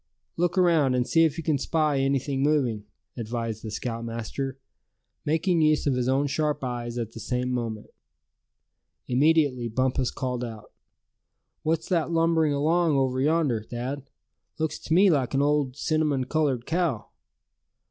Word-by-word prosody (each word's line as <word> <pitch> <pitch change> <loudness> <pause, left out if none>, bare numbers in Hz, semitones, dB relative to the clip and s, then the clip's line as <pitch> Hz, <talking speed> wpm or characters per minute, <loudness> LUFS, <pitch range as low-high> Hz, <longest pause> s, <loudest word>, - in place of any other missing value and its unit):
"Look 175 +3 0
around, 165 -8 +4
and 125 0 0
see 165 0 +4
if 160 0 -1
you 165 - -4
can 150 -2 +1
spy 155 -1 +1
anything 135 0 0
moving," 130 -8 +1 0.3
advised 115 -1 -4
the 110 - -5
scoutmaster, 115 +4 -4 0.7
making 165 +3 +2
use 155 -1 +3
of 140 - +2
his 125 0 0
own 135 +2 +2
sharp 150 0 -1
eyes 120 -1 -4
at 115 -2 -3
the 115 - -9
same 125 +2 -2
moment. 115 -4 -4 1.2
Immediately 140 -2 +2
Bumpus 130 +2 0
called 125 -3 -3
out: 110 -3 -8 0.9
"What's 160 +1 -1
that 170 -4 +1
lumbering 165 -2 +2
along 155 +2 +2
over 130 -1 +1
yonder, 145 -6 +2
Thad? 130 +5 -5 0.5
Looks 160 -1 -2
to 160 - -3
me 190 +1 +6
like 135 -4 0
an 135 - +3
old, 145 -3 +1
cinnamon 150 -4 +1
colored 135 -3 0
cow." 165 -9 -1
135 Hz, 145 wpm, -26 LUFS, 125-155 Hz, 1.2 s, me